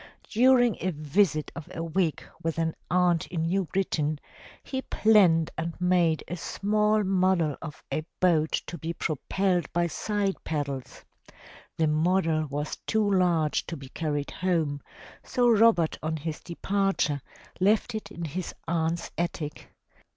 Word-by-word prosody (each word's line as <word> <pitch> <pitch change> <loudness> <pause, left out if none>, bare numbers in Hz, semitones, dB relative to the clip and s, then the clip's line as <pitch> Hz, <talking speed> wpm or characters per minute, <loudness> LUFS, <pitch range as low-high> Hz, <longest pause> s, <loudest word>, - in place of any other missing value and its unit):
During 245 -1 +5
a 185 - -1
visit 155 0 +1
of 165 - -8
a 165 - -3
week 165 -1 0 0.2
with 165 0 -2
an 165 -1 0 0.2
aunt 175 -1 +2
in 165 -2 -2
New 185 +3 +1
Britain, 155 -5 -1 0.4
he 265 -1 -3
planned 190 -11 +4
and 165 +1 -4
made 180 -3 +2
a 175 - -4
small 210 +4 +1
model 185 -5 +2
of 150 -2 -8
^ 155 - -2
boat 160 -4 +3 0.2
to 170 - -7
be 165 +1 -3
propelled 175 +2 -1
by 175 0 +2
side 200 +3 -2
paddles. 140 -4 -4 0.7
The 160 - +3
model 160 0 +2
was 145 +2 -3
too 215 -2 +2
large 170 -5 +2
to 165 - -5
be 135 -2 -10
carried 145 -1 -2
home, 160 -6 0 0.4
so 245 -1 +1
Robert 225 -7 +4
on 160 +1 -2
his 155 +1 -4
departure 185 -4 0 0.4
left 210 +5 +2
it 215 -2 -5
in 170 -4 -6
his 170 +4 -5
aunt's 165 0 -1
attic. 160 -3 -4
170 Hz, 145 wpm, -27 LUFS, 155-195 Hz, 0.7 s, During